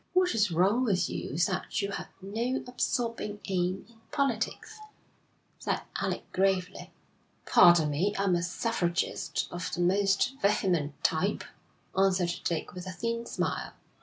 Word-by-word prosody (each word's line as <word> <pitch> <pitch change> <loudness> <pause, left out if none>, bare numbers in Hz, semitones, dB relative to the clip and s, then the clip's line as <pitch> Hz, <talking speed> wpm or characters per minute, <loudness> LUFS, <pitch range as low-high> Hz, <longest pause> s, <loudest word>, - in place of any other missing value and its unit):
'What 365 0 +3
is 210 -2 +3
wrong 190 +9 +3
with 185 -7 +1
you - - -4
is 170 +4 +3
that 190 -3 -2
you 200 - -1
have - - -5 0.2
no 230 +7 -2
absorbing 235 -4 -2
aim 185 -1 -1
in 225 -1 -22
politics,' 275 - -1 0.8
said - - -1 0.2
Alec - - -2
gravely. 190 -1 0 0.6
'Pardon 175 -4 +6
me, 190 +8 0
I 195 - +1
am 195 -2 +2
a 170 - +1
suffragist 175 -4 -1
of 175 0 -4
the 175 - -2
most 195 +8 +2
vehement 180 -8 +1
type,' - - +1 0.5
answered 185 -2 +3
Dick, 170 -2 -2
with 180 0 -7
a - - -3
thin 230 +5 -3
smile. - - -2
195 Hz, 145 wpm, -29 LUFS, 175-225 Hz, 0.8 s, Pardon